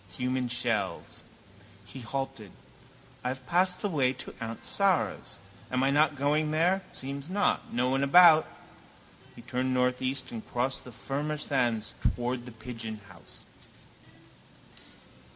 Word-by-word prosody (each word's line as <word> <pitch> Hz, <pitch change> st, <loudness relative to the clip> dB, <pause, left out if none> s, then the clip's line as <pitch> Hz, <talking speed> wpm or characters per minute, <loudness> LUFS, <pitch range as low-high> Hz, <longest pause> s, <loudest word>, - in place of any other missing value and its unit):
Human 125 Hz, 0 st, -1 dB
shells. 110 Hz, -7 st, -1 dB, 0.6 s
He 130 Hz, +6 st, -10 dB
halted. 135 Hz, -5 st, -5 dB, 0.7 s
I -, -, -1 dB
have 130 Hz, 0 st, -4 dB
passed 180 Hz, +5 st, +2 dB
the 205 Hz, -, 0 dB
way 135 Hz, -8 st, +1 dB
to 130 Hz, -, -7 dB
aunt 115 Hz, 0 st, -6 dB
Sara's. 195 Hz, -4 st, +1 dB, 0.3 s
Am 130 Hz, +1 st, 0 dB
I 135 Hz, -, +3 dB
not 150 Hz, +1 st, +4 dB
going 150 Hz, +2 st, +1 dB
there? 170 Hz, +5 st, +2 dB
Seems 140 Hz, +3 st, -5 dB
not. 200 Hz, +2 st, 0 dB
No 125 Hz, +2 st, +1 dB
one 135 Hz, +1 st, +1 dB
about. 160 Hz, +2 st, +7 dB, 0.9 s
He -, -, -12 dB
turned 130 Hz, +1 st, -1 dB
northeast 130 Hz, +1 st, 0 dB
and 115 Hz, -2 st, -6 dB
crossed 125 Hz, +2 st, -2 dB
the 125 Hz, -, -10 dB
firmer 145 Hz, +5 st, -3 dB
sand 120 Hz, -7 st, 0 dB
towards 120 Hz, 0 st, -1 dB
the 125 Hz, -, -9 dB
Pigeonhouse. 110 Hz, -5 st, -8 dB
130 Hz, 130 wpm, -29 LUFS, 120-150 Hz, 0.9 s, about